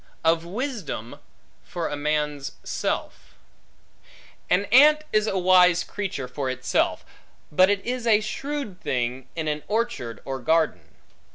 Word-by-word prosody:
Of 165 0 +3
Wisdom 190 - -5 0.4
For 170 -2 -4
A - - -3
Man's 150 -1 -2
Self - - -4 1.1
AN 200 +3 +3
ANT 300 +5 +7
is 215 0 +3
a 195 - 0
wise 180 -1 +5
creature 190 -10 -4
for 130 +1 -3
itself, 130 0 0 0.5
but 185 +5 +5
it 205 -1 0
is 245 0 -2
a 215 -2 +5
shrewd 245 -2 -5
thing, 125 +1 -2
in 160 -2 -3
an 150 0 -1
orchard 215 - -2
or 135 -1 -4
garden. 150 - 0
175 Hz, 130 wpm, -24 LUFS, 145-215 Hz, 1.1 s, ANT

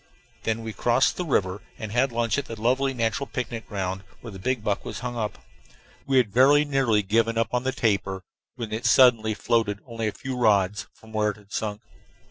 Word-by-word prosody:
Then 115 0 -1
we 110 -1 -5
crossed 120 +4 +2
the 180 - -3
river 100 - 0 0.2
and 110 -3 -6
had 125 +3 +2
lunch 115 +2 0
at 140 - -5
the 115 -4 -8
lovely 130 +4 +2
natural 115 +2 -1
picnic 120 -2 -5
ground 95 -2 -3 0.2
where 115 - -8
the 100 +7 -1
buck 105 -4 -2
was - - -6
hung 125 -1 -4
up. 110 -3 -3 0.7
We 135 -1 +3
had 115 -6 +2
very 145 +5 +6
nearly 135 -7 +2
given 115 +3 +1
up 115 - +1
the 125 +2 0
tapir 100 -5 0 0.3
when 115 -4 -6
it 110 +2 -1
suddenly 115 -4 +5
floated 110 -2 +1
only 115 -2 -3
a - - 0
few 130 +4 -6
rods 105 -4 +2
from 110 - -17
where 105 -1 +2
it 105 - -5
had 105 -1 -17
sunk. 105 -1 -3
115 Hz, 200 wpm, -25 LUFS, 105-125 Hz, 0.7 s, very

